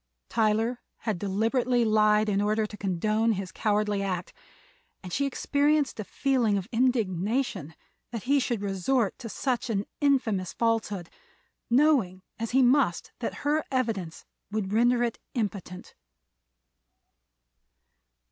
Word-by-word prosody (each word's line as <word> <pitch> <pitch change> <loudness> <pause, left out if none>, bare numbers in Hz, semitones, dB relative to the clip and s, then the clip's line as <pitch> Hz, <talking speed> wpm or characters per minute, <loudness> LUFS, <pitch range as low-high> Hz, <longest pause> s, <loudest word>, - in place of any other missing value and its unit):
Tyler 225 +2 +1 0.2
had 215 -6 -2
deliberately 230 +5 +1
lied 215 0 +4
in 200 -1 +1
order 215 +1 +1
to 210 - -8
condone 215 +4 +1
his 190 -3 -5
cowardly 210 -1 0
act, 185 -3 -3 0.7
and 180 -2 -7
she 280 0 +1
experienced 285 0 +1
a - - -2
feeling 245 -3 +1
of 190 - -4
indignation 225 - 0 0.3
that 230 -3 -5
he 280 +2 +3
should 240 -5 -1
resort 200 +3 0
to 235 -3 -7
such 250 +3 -2
an 205 -2 0
infamous 235 - +1
falsehood, 220 -6 -1 0.6
knowing 240 -9 +3 0.2
as 230 0 -2
he 265 +1 +4
must 250 - +2
that 235 - -4
her 300 +1 +2
evidence 220 -11 -2 0.2
would 205 -2 -2
render 240 +2 +3
it 235 -1 -2 0.2
impotent. 200 -5 -4
220 Hz, 125 wpm, -27 LUFS, 200-250 Hz, 0.7 s, lied